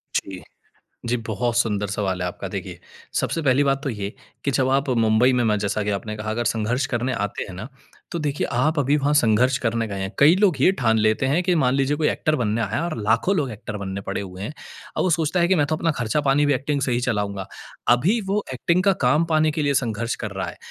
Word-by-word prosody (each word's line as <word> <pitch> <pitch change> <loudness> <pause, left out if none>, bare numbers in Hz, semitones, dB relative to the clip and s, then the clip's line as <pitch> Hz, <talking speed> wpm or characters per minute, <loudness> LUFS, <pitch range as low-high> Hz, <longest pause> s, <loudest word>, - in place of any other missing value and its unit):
जी। 95 -2 -2 0.7
जी, 125 - +2
बहुत 115 +1 -1
सुंदर 105 -4 +1
सवाल 95 -3 -2
है - - -1
आपका। 90 - -6
देखिए, - - -6 0.4
सबसे 165 - -2
पहली 135 0 +3
बात 135 0 +1
तो 135 - -1
ये 105 -3 -5 0.3
कि 140 - +1
जब 130 -1 +1
आप 135 +1 +1 0.2
मुंबई 110 +4 +4
में, 125 - +2
मैं 105 -1 +2
जैसा 105 +1 -1
कि 105 - -1
आपने 105 +2 -3
कहा, 110 0 -4
अगर 120 +2 -1
संघर्ष 120 +5 0
करने 125 +2 0
आते 105 +1 -3
हैं 95 - -9
ना, 95 +8 -7 0.4
तो 170 - -2
देखिए, 145 -2 -1
आप 150 +6 +1
अभी 145 +1 +2
वहाँ 145 +1 +1
संघर्ष 125 0 +3
करने 115 -1 -1
गए 100 -1 -5
हैं। 95 0 -3
कई 150 +5 +7
लोग 195 -6 +3
ये 185 - +6
ठान 110 -3 +2
लेते 110 +4 +2
हैं 150 +7 +2
कि, 180 0 +1
मान 135 -5 +2
लीजिए, 140 +2 +1
कोई 155 -1 +1
एक्टर 155 0 0
बनने 115 -2 0
आया 110 - -1
है - - 0
और 170 -7 -3
लाखों 115 - +2
लोग 140 -5 0
एक्टर 105 -1 -7
बनने 100 -1 -5
पड़े - - -2
हुए 95 -1 -8
हैं 105 - -4 0.4
और - - +1
वो 185 - +1
सोचता 165 +2 +1
है 175 - +3
कि, 190 - +4
"मैं 150 -5 +2
तो 155 - -1
अपना 165 +1 0
खर्चा-पानी 140 +4 +2
भी 145 - +3
एक्टिंग 140 +2 -1
से 130 -1 0
ही 120 - +1
चलाऊँगा।" 105 -5 -2 0.5
अभी 195 - +1
वो 205 +1 0
एक्टिंग 170 +8 +1
का 195 - +5
काम 150 +6 +4
पाने 155 0 +3
के 155 0 -2
लिए 140 -1 +1
संघर्ष 115 -2 -1
कर 110 - -3
रहा 95 -1 -4
है, - - -8
125 Hz, 250 wpm, -23 LUFS, 110-150 Hz, 0.7 s, कई